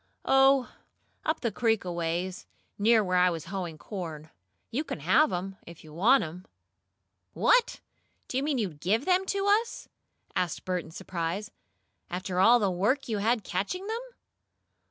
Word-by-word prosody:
"Oh, 270 Hz, -1 st, +4 dB, 0.5 s
up 315 Hz, +1 st, 0 dB
the 235 Hz, -, 0 dB
creek 225 Hz, -2 st, +1 dB
aways 175 Hz, +1 st, -3 dB, 0.3 s
near 220 Hz, +1 st, +5 dB
where 185 Hz, -1 st, +1 dB
I 180 Hz, 0 st, +5 dB
was 165 Hz, -3 st, -4 dB
hoeing 175 Hz, -3 st, -5 dB
corn. 160 Hz, -4 st, -7 dB, 0.4 s
You 275 Hz, +7 st, -1 dB
can 160 Hz, -, -6 dB
have 250 Hz, -, +4 dB
'em, 190 Hz, +2 st, -4 dB
if 170 Hz, -1 st, -12 dB
you 155 Hz, -1 st, -13 dB
want 230 Hz, -, +4 dB
'em." 175 Hz, +3 st, -8 dB, 0.9 s
"What! -, -, +3 dB, 0.5 s
Do -, -, -6 dB
you 265 Hz, -, +2 dB
mean 290 Hz, -1 st, 0 dB
to 215 Hz, -5 st, 0 dB
GIVE 195 Hz, -, 0 dB
them 375 Hz, +1 st, +2 dB
to 395 Hz, 0 st, 0 dB, 0.2 s
us?" 470 Hz, -, -10 dB, 0.5 s
asked 175 Hz, -3 st, -1 dB
Bert 180 Hz, -2 st, -1 dB
in -, -, -13 dB
surprise. 185 Hz, +3 st, -4 dB, 0.6 s
"After 180 Hz, +1 st, -3 dB
all 230 Hz, +6 st, +7 dB
the 205 Hz, -5 st, +1 dB
work 215 Hz, +10 st, 0 dB
you 215 Hz, -2 st, -1 dB
had 225 Hz, +1 st, +1 dB
catching 200 Hz, -, -3 dB
them?" 445 Hz, +3 st, -3 dB
195 Hz, 160 wpm, -28 LUFS, 175-260 Hz, 0.9 s, all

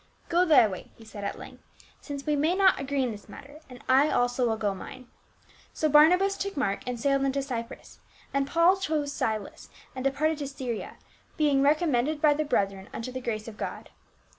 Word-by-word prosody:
" -, -, -33 dB
Go 350 Hz, +2 st, +3 dB
thy 305 Hz, -9 st, +6 dB
way," 185 Hz, -3 st, -8 dB
he 225 Hz, -, -16 dB
said 210 Hz, -2 st, -9 dB
at 200 Hz, -, -3 dB
length, -, -, -12 dB, 0.4 s
"since 280 Hz, -2 st, -7 dB
we 300 Hz, -1 st, +1 dB
may 310 Hz, +5 st, +1 dB
not 385 Hz, -1 st, +4 dB
agree 275 Hz, 0 st, -1 dB
in 250 Hz, -, -1 dB
this 205 Hz, -1 st, -11 dB
matter, 285 Hz, +2 st, -12 dB
and 250 Hz, -1 st, -12 dB
I 270 Hz, +3 st, +4 dB
also 245 Hz, -1 st, +1 dB
will 220 Hz, -, -1 dB
go 205 Hz, -2 st, -1 dB
mine." 255 Hz, +6 st, -10 dB, 0.7 s
So 310 Hz, -, +1 dB
Barnabas 355 Hz, +7 st, +5 dB
took 395 Hz, -3 st, -4 dB
Mark, 200 Hz, -7 st, 0 dB
and 245 Hz, -1 st, -3 dB
sailed 275 Hz, +1 st, +1 dB
unto 275 Hz, 0 st, 0 dB
Cyprus, 235 Hz, -4 st, -7 dB, 0.3 s
and 275 Hz, 0 st, 0 dB
Paul 340 Hz, +5 st, +4 dB
chose 305 Hz, -6 st, -2 dB
Silas 215 Hz, -5 st, -4 dB, 0.3 s
and 260 Hz, -, -5 dB
departed 295 Hz, +3 st, 0 dB
to 285 Hz, -, -3 dB
Syria, 260 Hz, -5 st, -5 dB, 0.4 s
being 290 Hz, -3 st, +3 dB
recommended 295 Hz, -1 st, +2 dB
by 295 Hz, -1 st, +5 dB
the 305 Hz, +1 st, -1 dB
brethren 195 Hz, -8 st, -1 dB
unto 230 Hz, +2 st, -6 dB
the 255 Hz, 0 st, -5 dB
grace 215 Hz, -3 st, -4 dB
of 220 Hz, -2 st, -9 dB
God. -, -, -6 dB
275 Hz, 200 wpm, -27 LUFS, 240-305 Hz, 0.7 s, thy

